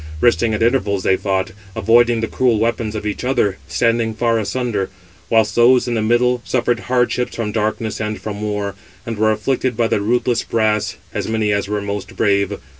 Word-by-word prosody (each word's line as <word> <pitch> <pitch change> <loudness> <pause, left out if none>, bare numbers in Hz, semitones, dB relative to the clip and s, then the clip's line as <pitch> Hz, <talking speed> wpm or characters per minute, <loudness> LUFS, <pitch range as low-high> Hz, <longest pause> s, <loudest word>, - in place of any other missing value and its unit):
Resting 115 0 +3
at 105 - 0
intervals, 105 -6 +1
they 95 - +3
fought, 95 -1 -1 0.2
avoiding 120 0 +3
the 115 - -1
cruel 125 -2 +1
weapons 110 -1 -1
of 105 - -4
each 105 +2 -3
other, 115 -7 +1
standing 115 -1 +1
far 115 0 +1
asunder; 110 -2 -2 0.4
whilst 110 -2 +3
those 125 +1 +4
in 120 - -1
the 115 - 0
middle 120 +2 +2
suffered 120 -2 0
hardships 125 0 0
from 110 -3 -2
darkness 110 0 -2
and 105 0 -3
from 105 -1 -6
war, 105 -1 -2 0.3
and 115 -2 -5
were 110 0 +3
afflicted 125 +2 -1
by 115 - +2
the 105 - 0
ruthless 120 +2 +1
brass, 110 -2 0 0.2
as - - -3
many 110 -1 0
as 100 -1 0
were 105 0 -2
most 100 -1 -5
brave. 100 -1 +1
110 Hz, 190 wpm, -19 LUFS, 105-120 Hz, 0.4 s, those